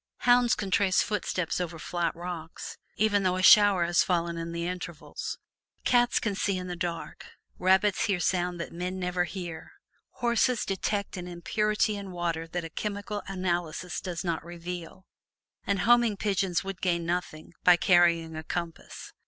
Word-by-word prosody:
Hounds 245 -1 +5
can 195 -3 -4
trace 185 0 +3
footsteps 185 -4 -2
over 170 -1 -4
flat 170 +1 -2
rocks, 170 -2 -7 0.2
even 210 -1 +2
though 185 -1 +1
a 185 - -2
shower 200 -4 +7
has 170 0 +3
fallen 170 -2 0
in 165 0 -4
the 170 0 -3
interval; 175 -3 -6 0.7
cats 245 -1 +3
can 210 - -1
see 195 0 0
in 180 - -4
the 180 -1 -4
dark; 170 -1 -4 0.4
rabbits 190 +2 +3
hear 195 -4 +1
sounds 180 0 0
that 170 - -6
men 180 +2 -3
never 180 -1 0
hear; 175 -3 -7 0.4
horses 240 0 +1
detect 200 +1 -2
an 180 0 -6
impurity 210 +5 0
in 200 -1 -6
water 170 -2 -2
that 175 +1 -4
a - - -6
chemical 205 +1 -4
analysis 175 -2 -2
does 180 -2 -4
not 165 -3 -2
reveal, 175 +1 -7 0.6
and 200 -2 +1
homing 235 -1 +4
pigeons 195 -4 0
would 195 -1 -6
gain 170 -2 0
nothing 170 -2 -3
by 180 - +8
carrying 170 -3 +3
a 160 - -5
compass. 170 0 -6
180 Hz, 160 wpm, -28 LUFS, 170-200 Hz, 0.7 s, by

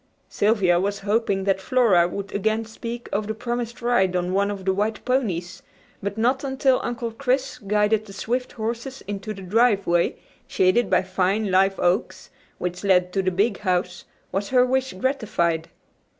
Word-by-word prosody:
Sylvia 200 -5 +2
was 200 +2 -1
hoping 200 -1 0
that 190 -1 +1
Flora 210 -7 +4
would 200 +2 -6
again 220 +2 0
speak 235 +2 -7
of 205 +1 -1
the 220 - -3
promised 235 0 -4
ride 190 -7 +2
on 180 0 -1
one 200 +1 +2
of 195 -2 -5
the 190 - +2
white 210 +3 -2
ponies, 200 -10 -1 0.4
but 200 +2 -4
not 255 +5 +1
until 265 -1 +2
Uncle 235 -1 -3
Chris 265 +2 -1
guided 210 +1 +1
the 195 - -10
swift 250 +5 -3
horses 235 +4 -5
into 205 +1 -4
the 195 -2 -8
driveway, 195 -4 +2 0.3
shaded 190 +4 +2
by - - +3
fine 190 +2 0
live 195 +1 +3
oaks, 180 +5 -1 0.3
which 180 +1 -4
led 180 -2 +3
to 195 - +1
the 185 - +1
big 200 +4 0
house, 180 -2 -1 0.3
was 195 +2 -2
her 250 -1 +4
wish 260 +1 0
gratified. 185 - -1
205 Hz, 165 wpm, -23 LUFS, 190-235 Hz, 0.4 s, Flora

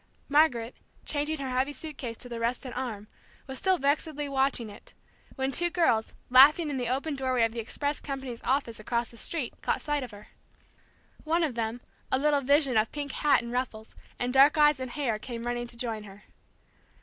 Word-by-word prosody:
Margaret, 275 -6 +3 0.3
changing 300 +1 -1
her 270 -2 -4
heavy 260 +3 0
suit 305 +2 -7
case 235 -4 -6
to - - -5
the 235 -1 -6
rested 240 +2 -2
arm, 225 -5 -5 0.4
was 265 -1 -7
still 375 -1 +2
vexedly 295 0 0
watching 270 -4 0
it, 205 0 -14 0.4
when 265 0 -1
two 345 +5 +3
girls, 320 -11 +1 0.2
laughing 295 +5 +7
in 275 - -2
the 245 -2 -2
open 275 +5 -1
doorway 260 -3 +1
of 225 - +2
the 235 - -5
express 285 +6 -2
company's 265 -4 -6
office 260 -4 -1
across 235 +2 -2
the 235 - -15
street, 275 +1 -2
caught - - 0
sight 295 -1 -1
of 255 - -6
her. 205 0 -13 0.9
One 330 +2 +1
of 300 -5 0
them, 230 +1 -3 0.3
a - - +3
little 290 +1 +2
vision 275 -2 +3
of 215 +1 +2
pink 285 -2 -4
hat 295 -4 +2
and 235 - -6
ruffles, 235 -3 -4 0.2
and 245 0 -2
dark 280 +4 +6
eyes 295 -2 +5
and 260 -1 -4
hair, 240 -5 -2
came 235 +1 -6
running 240 0 -2
to 235 - -11
join 230 -3 -3
her. 200 0 -13
260 Hz, 195 wpm, -28 LUFS, 235-290 Hz, 0.9 s, laughing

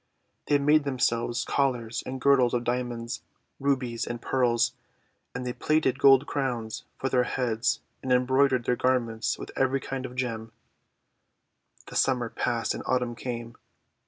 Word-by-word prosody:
They 145 - +4
made 150 +2 +4
themselves 120 -3 0
collars 125 -4 0
and 130 0 -4
girdles 130 -2 +4
of 120 - 0
Diamonds, 120 -1 -3 0.4
Rubies, 130 -4 0
and 120 0 -4
Pearls; 120 -2 +1 0.6
and 125 0 -4
they 125 - -2
plaited 150 -4 +1
gold 135 0 +6
crowns 120 -7 -3
for 135 - -2
their 125 -2 +2
heads, 120 -2 0 0.2
and 130 - -3
embroidered 130 0 +3
their 125 - +2
garments 115 -3 0
with - - -8
every 135 +1 +2
kind 130 -1 -4
of 125 - -12
gem. 115 -3 -3 1.3
The - - -10
Summer 125 -3 +2
passed 120 -2 -1
and - - -5
Autumn 125 -2 +1
came. 120 -1 -6
125 Hz, 145 wpm, -27 LUFS, 120-135 Hz, 1.3 s, gold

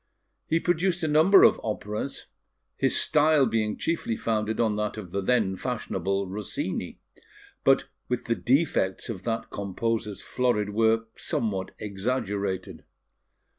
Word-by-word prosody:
He 165 - +2
produced 175 +1 +1
a - - +2
number 160 +6 +6
of - - +5
operas, 105 +4 -4 0.5
his - - +2
style 150 -2 +4
being 110 -2 0
chiefly 160 -9 -1
founded 110 -1 -1
on 110 -3 +2
that 105 +1 -2
of 95 -5 -8
the 100 - -1
then 105 -3 +2
fashionable 100 -4 -2
Rossini, 100 +2 -4 0.7
but - - +4 0.2
with 125 -1 -2
the 115 - +1
defects 125 - +1
of 100 -6 -5
that 115 -1 -2
composer's 105 +2 -3
florid 115 -5 0
work 110 +1 +1
somewhat 95 -5 -2
exaggerated. 100 -2 -3
110 Hz, 130 wpm, -27 LUFS, 100-125 Hz, 0.7 s, number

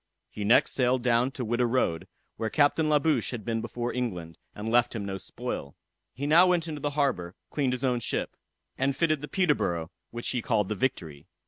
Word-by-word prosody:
He 105 - -5
next 105 +4 +4
sailed 125 -1 +1
down 120 +1 +3
to 125 - -4
Whydah 120 +2 +1
road, 115 -10 0 0.3
where 110 - -2
Captain 155 +3 +3
La 150 - +5
Bouche 145 - +1
had 120 -5 -5
been 115 -1 -1
before 120 +1 -3
England, 90 -10 -4 0.2
and 110 +2 -4
left 120 0 +3
him 105 -3 -3
no 95 -1 -3
spoil. 70 -6 -6 0.4
He 140 - -5
now 165 +5 +6
went 175 -2 +2
into 150 -2 -5
the 145 - 0
harbor, 90 -12 0 0.2
cleaned 135 -4 0
his 125 +1 -4
own 125 -2 +2
ship, 115 - -3 0.4
and 135 +1 +1
fitted 155 0 +2
up - - -17
the 150 - -5
Peterborough, 115 - 0 0.2
which 120 0 -3
he 125 - -1
called 105 -4 +1
the - - 0
Victory. 85 - -3
120 Hz, 210 wpm, -28 LUFS, 105-140 Hz, 0.4 s, now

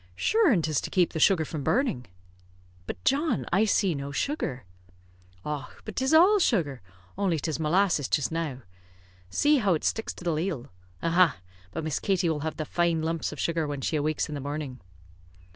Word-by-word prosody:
"Shure 435 - +3
an' 180 -8 +2
'tis 155 -3 0
to - - -5
keep 180 -2 +2
the 160 - -2
sugar 165 -2 +4
from 150 -2 -5
burning." 190 - 0 0.8
"But, - - -6
John, 275 - +1
I 200 +4 +4
see 195 -4 +2
no 140 -1 -5
sugar!" 140 - -2 0.8
"Och, 150 -2 -5
but 215 - -7
'tis 265 +1 0
all 365 +6 +6
sugar, 165 - +1 0.4
only 190 -5 +1
'tis 155 +1 -3
molasses 160 -2 +2
jist 145 - 0
now. 155 -6 -3 0.7
See 295 - +3
how 200 -8 +2
it 155 - -4
sticks 225 - -1
to - - -11
the 170 -2 0
ladle. 155 -5 -3 0.3
Aha! 170 - +4 0.3
But 160 - -5
Miss 155 -2 -1
Katie 185 -3 +1
will 155 -2 -1
have 160 +1 -4
the 155 - -3
fine 170 0 0
lumps 165 0 -2
of 150 - -9
sugar 165 -2 0
when 145 -2 -4
she 155 - -1
awakes 155 0 0
in 150 - -6
the 145 - -4
morning." 145 -2 -5
165 Hz, 190 wpm, -27 LUFS, 150-195 Hz, 0.8 s, all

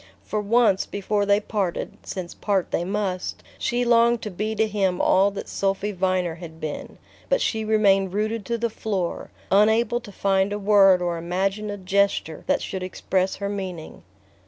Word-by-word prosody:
For 215 - -2
once 210 -2 +3
before 205 0 -1
they 200 0 +4
parted 205 -4 -3
since 180 -2 -6
part 195 -4 -1
they - - 0
must 190 -1 -3 0.2
she 245 +1 0
longed 235 0 +4
to 210 - -4
be 215 +4 -3
to 220 +1 +2
him 195 -4 0
all 195 +2 +4
that 200 - -7
Sophy 195 +1 -1
Viner 185 -2 0
had 160 -1 -10
been; 155 -2 -6 0.3
but - - +3
she 220 - 0
remained 200 -3 +3
rooted 215 +2 -1
to 235 - -1
the 230 0 -1
floor, 195 -6 -3 0.2
unable 220 +4 +4
to 235 -4 -12
find 195 0 +1
a 205 - -1
word 195 -3 +5
or 170 -1 -1
imagine 195 +5 -1
a 205 - -4
gesture 195 -4 0
that - - +1
should 190 - -4
express 185 +1 -1
her 200 - -4
meaning. 190 -5 -6
200 Hz, 175 wpm, -24 LUFS, 185-215 Hz, 0.3 s, word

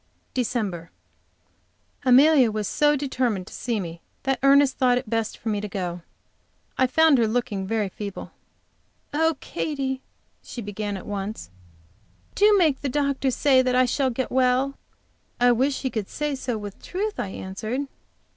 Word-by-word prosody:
DECEMBER. 210 -9 -2 1.2
Amelia 265 0 +6
was 215 -1 -2
so 295 0 +3
determined 255 -8 -1
to - - -13
see 235 -3 -2
me 170 -3 -6 0.2
that 270 0 0
Ernest 275 0 +4
thought 250 -1 +4
it 250 - -4
best 225 0 -2
for 225 - -4
me 205 -1 -1
to 210 - -4
go. 180 -4 -4 0.7
I 260 - +3
found 310 +1 +4
her 225 - +3
looking 215 -4 -2
very 215 -1 0
feeble. 200 +1 -7 0.8
"Oh, 320 0 +2
Katy," 270 -5 -3 0.4
she - - -9
began 205 -1 -4
at - - -10
once, 200 - -5 0.8
"do 415 0 +5
make 315 -7 +2
the 280 - -1
doctor 280 0 0
say 260 +1 +4
that 255 -1 +1
I 255 0 +5
shall 260 +2 +1
get 255 +1 -3
well!" 260 +2 +2 0.6
"I 245 0 +5
wish 265 +4 +1
he 260 - -1
could 215 -4 -3
say 295 -1 -2
so 255 -3 -3
with 205 -2 -8
truth," 415 +3 -3
I - - -1
answered. 205 +7 -4
250 Hz, 160 wpm, -24 LUFS, 210-275 Hz, 1.2 s, Amelia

